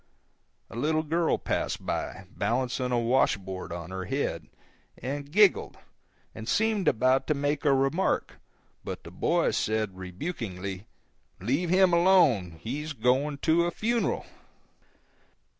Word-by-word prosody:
A -, -, -9 dB
little 155 Hz, +6 st, +1 dB
girl 165 Hz, +2 st, +1 dB
passed -, -, -2 dB
by, -, -, -3 dB
balancing 125 Hz, +1 st, -1 dB
a 120 Hz, -, +2 dB
wash 120 Hz, -1 st, +3 dB
board 95 Hz, -2 st, -7 dB
on 85 Hz, +1 st, -6 dB
her 95 Hz, 0 st, -4 dB
head, 90 Hz, -, -2 dB, 0.5 s
and 140 Hz, +2 st, -5 dB
giggled, 205 Hz, +1 st, +4 dB, 0.6 s
and 110 Hz, +1 st, -7 dB
seemed 220 Hz, -3 st, +1 dB
about 130 Hz, +2 st, +3 dB
to 150 Hz, -, +2 dB
make 145 Hz, +2 st, -1 dB
a 145 Hz, -, +5 dB
remark, 135 Hz, +7 st, +1 dB, 0.5 s
but -, -, -6 dB
the -, -, -10 dB
boy -, -, +1 dB
said, 110 Hz, -3 st, -1 dB
rebukingly, 95 Hz, -, -5 dB, 0.5 s
"Let 140 Hz, -, 0 dB
him 185 Hz, 0 st, +4 dB
alone, 160 Hz, -, +4 dB
he's 150 Hz, +6 st, -4 dB
going 135 Hz, +4 st, +1 dB
to 170 Hz, +1 st, +3 dB
a -, -, +1 dB
funeral." 230 Hz, +6 st, -1 dB
135 Hz, 130 wpm, -28 LUFS, 110-160 Hz, 0.6 s, a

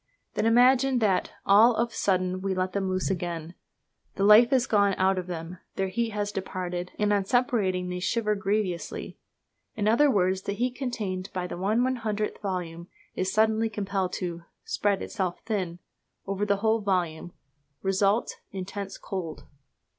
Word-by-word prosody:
Then 225 Hz, -, +1 dB
imagine 255 Hz, +3 st, +5 dB
that 205 Hz, -5 st, +2 dB, 0.2 s
all 220 Hz, +4 st, +6 dB
of 235 Hz, +1 st, +1 dB
a -, -, -17 dB
sudden 185 Hz, -1 st, 0 dB
we 195 Hz, -1 st, -1 dB
let 185 Hz, 0 st, -1 dB
them 195 Hz, -1 st, -1 dB
loose 185 Hz, +1 st, 0 dB
again. 170 Hz, -2 st, -4 dB, 0.6 s
The 195 Hz, -, -1 dB
life 210 Hz, +4 st, +7 dB
is 260 Hz, -2 st, +3 dB
gone 200 Hz, -5 st, +3 dB
out 190 Hz, 0 st, +2 dB
of 180 Hz, -, -6 dB
them, 170 Hz, 0 st, -6 dB, 0.2 s
their 190 Hz, 0 st, -1 dB
heat 230 Hz, +4 st, -1 dB
has 205 Hz, -1 st, -2 dB
departed, 180 Hz, -2 st, -4 dB
and 210 Hz, 0 st, +2 dB
on 200 Hz, -1 st, +1 dB
separating 195 Hz, -6 st, +1 dB
they 180 Hz, 0 st, -3 dB
shiver 210 Hz, +3 st, 0 dB
grievously. 195 Hz, -3 st, -2 dB, 0.6 s
In 210 Hz, -1 st, -1 dB
other 245 Hz, +7 st, +5 dB
words, 190 Hz, -5 st, +2 dB
the 200 Hz, -, -3 dB
heat 245 Hz, +4 st, -1 dB
contained 210 Hz, -8 st, -4 dB
by 180 Hz, -1 st, -2 dB
the -, -, -6 dB
1/100 215 Hz, +2 st, -1 dB
volume 175 Hz, -4 st, -4 dB, 0.3 s
is 185 Hz, 0 st, -1 dB
suddenly 220 Hz, +1 st, +2 dB
compelled 195 Hz, -3 st, -2 dB
to 170 Hz, -2 st, -4 dB, 0.2 s
"spread 205 Hz, -, 0 dB
itself 185 Hz, -4 st, -3 dB
thin" 190 Hz, -6 st, -2 dB, 0.5 s
over 195 Hz, +1 st, -2 dB
the 200 Hz, -1 st, +2 dB
whole 220 Hz, +1 st, +3 dB
volume: 175 Hz, -4 st, -1 dB, 0.5 s
result 195 Hz, +3 st, +1 dB
intense 195 Hz, +1 st, -6 dB
cold. 165 Hz, -6 st, -5 dB
195 Hz, 160 wpm, -27 LUFS, 185-220 Hz, 0.6 s, life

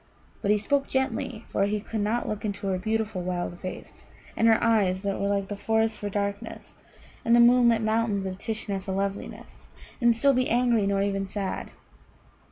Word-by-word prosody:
But 200 Hz, -, -1 dB
he 210 Hz, -, +5 dB
spoke 275 Hz, +7 st, 0 dB
gently, 265 Hz, -4 st, -2 dB
for 195 Hz, -, +1 dB
he 210 Hz, +1 st, -1 dB
could 220 Hz, +1 st, -5 dB
not 220 Hz, +4 st, 0 dB
look 210 Hz, -1 st, -4 dB
into 205 Hz, -1 st, -4 dB
her 190 Hz, -1 st, 0 dB
beautiful 220 Hz, -1 st, -1 dB
wild 175 Hz, -1 st, -3 dB
face, 185 Hz, -, -8 dB, 0.3 s
and 225 Hz, -, +3 dB
her 225 Hz, -1 st, +6 dB
eyes, 200 Hz, -5 st, +2 dB
that 200 Hz, -1 st, -2 dB
were 200 Hz, -, +1 dB
like 200 Hz, -1 st, 0 dB
the 205 Hz, -, -4 dB
forest 220 Hz, +1 st, 0 dB
for 205 Hz, -, -3 dB
darkness 200 Hz, +2 st, -4 dB, 0.5 s
and 235 Hz, -, +4 dB
the -, -, +6 dB
moonlit 235 Hz, -1 st, +5 dB
mountains 215 Hz, -2 st, 0 dB
of 190 Hz, 0 st, -5 dB
Tishnar 210 Hz, -3 st, -3 dB
for 190 Hz, 0 st, -4 dB
loveliness, 195 Hz, +1 st, -5 dB, 0.3 s
and 235 Hz, -1 st, +4 dB
still 275 Hz, +5 st, +4 dB
be 255 Hz, 0 st, +1 dB
angry, 235 Hz, -3 st, +2 dB
nor 200 Hz, 0 st, +1 dB
even 195 Hz, -1 st, -1 dB
sad. 195 Hz, -1 st, -4 dB
210 Hz, 185 wpm, -26 LUFS, 195-230 Hz, 0.5 s, her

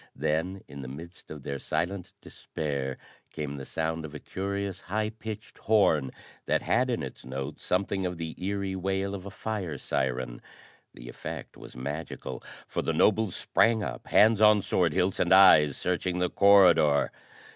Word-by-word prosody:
Then, 90 Hz, +5 st, -1 dB
in 70 Hz, -, -9 dB
the 65 Hz, -, -7 dB
midst 85 Hz, +7 st, -10 dB
of 75 Hz, -3 st, -9 dB
their 70 Hz, 0 st, -4 dB
silent 90 Hz, +5 st, -3 dB
despair, 70 Hz, -3 st, -4 dB, 0.3 s
came 70 Hz, -2 st, -5 dB
the 65 Hz, -, -8 dB
sound 80 Hz, 0 st, -2 dB
of 80 Hz, -1 st, -8 dB
a -, -, -6 dB
curious, 100 Hz, +1 st, -4 dB
high 105 Hz, +3 st, -2 dB
pitched 110 Hz, -1 st, -8 dB
horn 80 Hz, -11 st, +3 dB, 0.4 s
that -, -, +1 dB
had -, -, +2 dB
in -, -, -1 dB
its -, -, -8 dB
note 65 Hz, +3 st, -6 dB
something 95 Hz, +1 st, -1 dB
of 90 Hz, -1 st, -5 dB
the 80 Hz, -1 st, -5 dB
eery 100 Hz, 0 st, -2 dB
wail 95 Hz, +1 st, -1 dB
of 100 Hz, -1 st, -6 dB
a -, -, -5 dB
fire 95 Hz, -6 st, -4 dB
siren. 65 Hz, -2 st, -2 dB, 0.5 s
The -, -, -11 dB
effect -, -, -7 dB
was -, -, -12 dB
magical, 70 Hz, +6 st, -5 dB, 0.3 s
for -, -, -2 dB
the -, -, -1 dB
nobles 110 Hz, -2 st, +2 dB
sprang 115 Hz, -2 st, +2 dB
up, -, -, -6 dB
hands 110 Hz, 0 st, +5 dB
on 105 Hz, -2 st, +6 dB
sword 85 Hz, -4 st, +1 dB
hilts 90 Hz, +5 st, 0 dB
and 85 Hz, -, +1 dB
eyes 75 Hz, -7 st, +7 dB
searching 90 Hz, 0 st, -1 dB
the 90 Hz, -1 st, 0 dB
corridor. 90 Hz, -7 st, +5 dB
90 Hz, 165 wpm, -28 LUFS, 75-100 Hz, 0.5 s, eyes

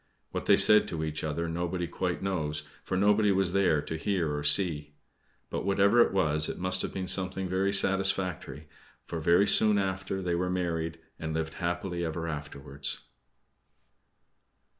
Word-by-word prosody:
What -, -, -5 dB
they -, -, +6 dB
said 105 Hz, 0 st, +6 dB
to 80 Hz, -6 st, -4 dB
each 75 Hz, -1 st, -4 dB
other 80 Hz, +2 st, -2 dB
nobody 85 Hz, +1 st, -3 dB
quite 90 Hz, +1 st, -3 dB
knows, 75 Hz, -6 st, -2 dB, 0.2 s
for 95 Hz, -, -2 dB
nobody 105 Hz, +1 st, +3 dB
was 95 Hz, -2 st, +1 dB
there 90 Hz, -7 st, +2 dB
to 80 Hz, -, -5 dB
hear 85 Hz, -4 st, -1 dB
or 75 Hz, -, -4 dB
see. 75 Hz, -2 st, +3 dB, 0.6 s
But -, -, -3 dB
whatever 100 Hz, +4 st, +3 dB
it -, -, +3 dB
was, 75 Hz, -5 st, +2 dB
it -, -, -5 dB
must 95 Hz, 0 st, +1 dB
have -, -, -3 dB
been 95 Hz, -1 st, -4 dB
something 95 Hz, 0 st, -1 dB
very 95 Hz, +2 st, 0 dB
satisfactory; 95 Hz, -7 st, 0 dB, 0.4 s
for 85 Hz, -, -5 dB
very 85 Hz, +5 st, +4 dB
soon 105 Hz, 0 st, +4 dB
after 95 Hz, 0 st, -2 dB
they 90 Hz, -1 st, -1 dB
were 90 Hz, +1 st, -1 dB
married, 85 Hz, -3 st, -2 dB, 0.2 s
and 80 Hz, 0 st, -4 dB
lived 80 Hz, 0 st, -3 dB
happily 85 Hz, 0 st, -2 dB
ever 80 Hz, 0 st, -3 dB
afterwards. 70 Hz, -2 st, -5 dB
90 Hz, 160 wpm, -28 LUFS, 80-95 Hz, 0.6 s, they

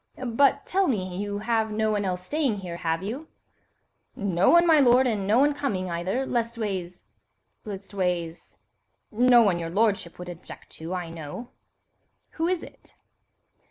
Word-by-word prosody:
"But, 255 Hz, +3 st, +2 dB
tell 385 Hz, 0 st, +1 dB
me, 185 Hz, -, -2 dB
you 205 Hz, +1 st, -3 dB
have 220 Hz, +1 st, 0 dB
no 215 Hz, 0 st, 0 dB
one 205 Hz, -1 st, 0 dB
else 180 Hz, -1 st, -2 dB
staying 270 Hz, -6 st, -1 dB
here, 175 Hz, -2 st, -6 dB
have 165 Hz, +1 st, -2 dB
you?" 255 Hz, +10 st, -5 dB, 0.9 s
"No 190 Hz, -2 st, +1 dB
one, 340 Hz, 0 st, +6 dB
my 320 Hz, -3 st, +6 dB
lord, 255 Hz, -1 st, +5 dB
and 210 Hz, -6 st, -1 dB
no 215 Hz, +3 st, +4 dB
one 290 Hz, +3 st, +4 dB
coming, 205 Hz, -11 st, -2 dB
either, 185 Hz, +10 st, -1 dB
leastways—" 215 Hz, -8 st, -3 dB, 0.5 s
"Leastways?" 185 Hz, -4 st, -4 dB, 0.5 s
"No 245 Hz, +1 st, +6 dB
one 185 Hz, -5 st, +2 dB
your 165 Hz, -1 st, -4 dB
lordship 200 Hz, -2 st, 0 dB
would 180 Hz, -, -8 dB
object 175 Hz, 0 st, -11 dB
to, 165 Hz, +3 st, -6 dB
I 175 Hz, -2 st, -5 dB
know." 165 Hz, +9 st, -8 dB, 0.8 s
"Who 325 Hz, +1 st, -1 dB
is 360 Hz, -2 st, -1 dB
it?" -, -, -15 dB
205 Hz, 155 wpm, -26 LUFS, 180-245 Hz, 0.9 s, one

